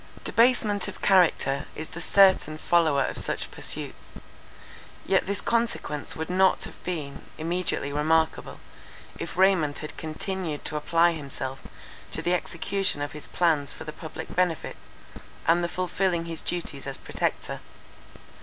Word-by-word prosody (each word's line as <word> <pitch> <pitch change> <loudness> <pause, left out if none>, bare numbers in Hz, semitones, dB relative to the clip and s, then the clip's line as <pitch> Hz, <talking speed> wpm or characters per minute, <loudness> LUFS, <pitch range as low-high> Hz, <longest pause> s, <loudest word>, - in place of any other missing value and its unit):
Debasement 225 -4 +3
of - - -7
character 160 -7 +3
is 155 - -4
the 170 - -6
certain 190 -5 +5
follower 155 -5 +3
of - - -3
such - - -3
pursuits. - - -4 0.9
Yet 190 -1 +2
this 200 0 -1
consequence 230 -11 -1
would 160 0 -4
not 190 +1 +3
have - - -9
been 155 -6 -4 0.2
immediately 165 -3 -1
remarkable, 160 +2 +1 0.6
if - - -6
Raymond 185 -6 +4
had 155 - -6
continued 160 0 -4
to 150 - -1
apply 165 +3 +3
himself 135 -4 -5 0.5
to - - 0
the 175 - +2
execution 190 0 0
of 145 0 -3
his 150 - -8
plans 160 -5 +1
for - - -8
the 155 - -7
public 160 -2 -8
benefit, 175 -4 0 0.7
and 170 +1 +4
the 170 - 0
fulfilling 180 -1 0
his 165 -1 -4
duties 150 -6 -3
as 135 - -4
Protector. - - -3
165 Hz, 140 wpm, -27 LUFS, 150-185 Hz, 0.9 s, certain